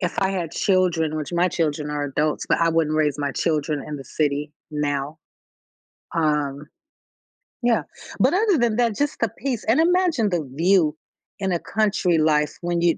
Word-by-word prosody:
if 180 -2 -2
I 195 0 +2
had 170 -4 -3
children, 175 -6 +1
which 155 +3 -4
my 175 +1 +3
children 150 -3 -1
are 145 -1 -2
adults, 150 +2 -1
but - - +3
I 165 0 +3
wouldn't 160 -1 +1
raise 150 -2 +1
my 140 -1 -1
children 150 -2 -1
in 150 -1 -5
the 135 - -9
city 150 0 -1 0.2
now. 145 0 -2 1.0
Um, 150 -3 0 0.9
yeah, 240 -1 +2 0.4
but - - +4
other 405 -2 +3
than 235 -3 +1
that, 235 -3 +2
just 290 0 -1
the 230 - +1
peace, 255 -4 -3
and 225 +7 +3
imagine 335 - +3
the 170 -6 -2
view 170 -2 +3 0.4
in 190 -1 -1
a 175 - 0
country 200 -5 +1
life 150 -1 +2
when 175 0 -1
you 170 -1 +3
165 Hz, 175 wpm, -23 LUFS, 150-200 Hz, 1.0 s, but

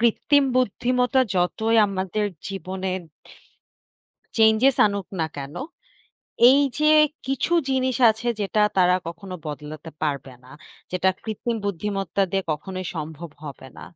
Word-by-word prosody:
কৃত্রিম 275 +5 +3
বুদ্ধিমত্তা 250 +2 +1 0.2
যতই 220 +6 +1
আমাদের 195 +1 -2 0.2
জীবনে 190 0 -5 1.5
চেঞ্জেস 225 +4 +5
আনুক 200 -3 -3
না 160 - +1
কেন? 140 0 -7 1.0
এই 275 +2 +5 0.2
যে 305 0 +4 0.4
কিছু 270 +5 -1 0.2
জিনিস 260 -1 +1
আছে 220 +2 -5
যেটা 205 +1 0 0.2
তারা 180 0 +4
কখনো 185 +2 -8
বদলাতে 150 +2 -7
পারবে 140 -3 -2
না। 130 - -16 0.4
যেটা 185 +1 +1
কৃত্রিম 225 +2 -3
বুদ্ধিমত্তা 195 -1 -2
দিয়ে 195 0 0
কখনোই 185 +4 -5
সম্ভব 160 +1 -6
হবে 140 -2 -9
না। - - -10
195 Hz, 120 wpm, -23 LUFS, 170-230 Hz, 1.5 s, চেঞ্জেস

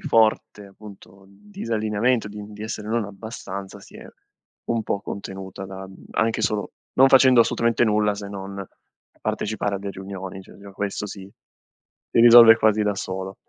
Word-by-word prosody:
forte 110 -2 +1
appunto 100 -1 -15
disallineamento, 105 +3 -2
di 105 0 -8
di 105 0 -9
essere 110 -1 -6
non 115 0 0
abbastanza, 100 -1 -8
si - - -15
è - - -11 0.6
un 115 -1 0
po' 100 -2 -2
contenuta 95 -1 -7
da, 95 0 -8
mhmm, 95 0 -15
anche 115 0 0
solo 105 -1 -1 0.2
non 135 +1 +6
facendo 130 -2 +6
assolutamente 115 +1 +2
nulla 105 -1 +2
se 100 0 -7
non 100 0 -7 0.6
partecipare 105 -1 -2
alle 100 +1 -6
riunioni, 95 0 -8
cioè - - -16
già 100 0 -12
questo 100 +1 -4
si 95 -1 -9 0.8
si - - +3
risolve 115 -1 +9
quasi 110 -1 +2
da 105 -1 0
solo. 95 0 -5
105 Hz, 155 wpm, -23 LUFS, 100-110 Hz, 0.8 s, risolve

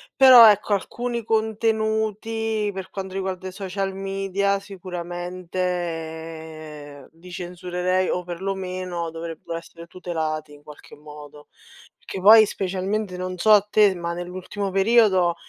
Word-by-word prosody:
però 255 -4 +10
ecco, 210 0 +2
alcuni 235 +4 -3
contenuti, 220 0 -1
per 190 -1 -7
quando 190 -1 -6
riguarda 190 -1 -4
i - - -6
social 195 0 -4
media, 195 +1 -1
sicuramente 170 -5 -6
li 180 +2 -13
censurerei, 180 +1 -2
o 180 - -1
perlomeno, 180 -1 -4
dovrebbero 165 0 -6
essere 170 0 -13
tutelati 160 -4 -4
in 145 - -16
qualche 150 0 -14
modo. 150 0 -13 0.5
Che - - -6
poi 215 +3 +8
specialmente 195 +1 -3
non 185 0 -5
so 215 +5 +3
a 210 -1 +8
te, 210 0 +3
ma 170 -1 -4
nell'ultimo 180 +3 -5
periodo, 195 -3 +3
185 Hz, 120 wpm, -23 LUFS, 170-200 Hz, 0.5 s, però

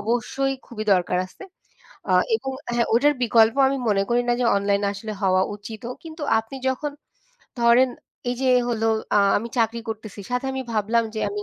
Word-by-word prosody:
অবশ্যই 245 +5 -1
খুবই 215 -2 -6
দরকার 180 0 0
আছে। 185 - -15 0.7
আ - - +3 0.2
এবং 265 - -5 0.2
হ্যাঁ 235 -1 +2
ওটার 290 +5 +4
বিকল্প 225 0 +4
আমি 275 0 -1
মনে 200 -2 +2
করি 240 +1 +3
না - - +4
যে - - +2
অনলাইন 200 0 +1
আসলে 215 +2 -6
হওয়া 185 -1 +3
উচিতও। 220 +4 -7
কিন্তু 320 -1 -9 0.2
আপনি 225 +5 -10
যখন 285 +3 -2 0.7
ধরেন 240 +2 +5 0.4
এই 245 - -2
যে 260 - +3 0.2
হলো 225 -1 0 0.3
আ - - +6 0.2
আমি 230 +3 -6
চাকরি 230 0 +1
করতেছি 215 -2 -6
সাথে 250 +2 -1
আমি 265 0 -3
ভাবলাম 225 +2 +1
যে 215 - -3
আমি 205 0 -4
230 Hz, 180 wpm, -23 LUFS, 210-250 Hz, 0.7 s, আ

